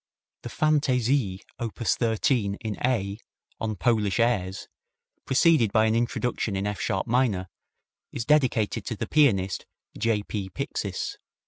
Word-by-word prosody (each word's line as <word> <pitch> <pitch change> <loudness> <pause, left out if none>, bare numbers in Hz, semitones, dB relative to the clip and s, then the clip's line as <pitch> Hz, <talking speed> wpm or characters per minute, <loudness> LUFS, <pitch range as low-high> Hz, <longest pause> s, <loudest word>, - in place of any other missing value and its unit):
The 120 - -7
Fantaisie, 130 -7 +1 0.2
op 115 -2 -4
13, 110 -1 +1
in 110 -1 -5
A, 105 -5 0 0.4
on 110 -1 -2
Polish 105 +2 +1
airs, 100 -6 0 0.6
preceded 135 -5 +4
by 110 +1 +4
an 110 - +2
introduction 120 -2 -1
in 95 +1 -1
F 105 -2 -3
sharp 95 - -1
minor, 110 -7 +1 0.6
is 115 - -4
dedicated 130 -8 +2
to 115 - -2
the - - -3
pianist 100 -11 +2 0.3
J. 110 -3 0
P. 100 -2 -4
Pixis. 90 - -4
110 Hz, 130 wpm, -26 LUFS, 100-125 Hz, 0.6 s, preceded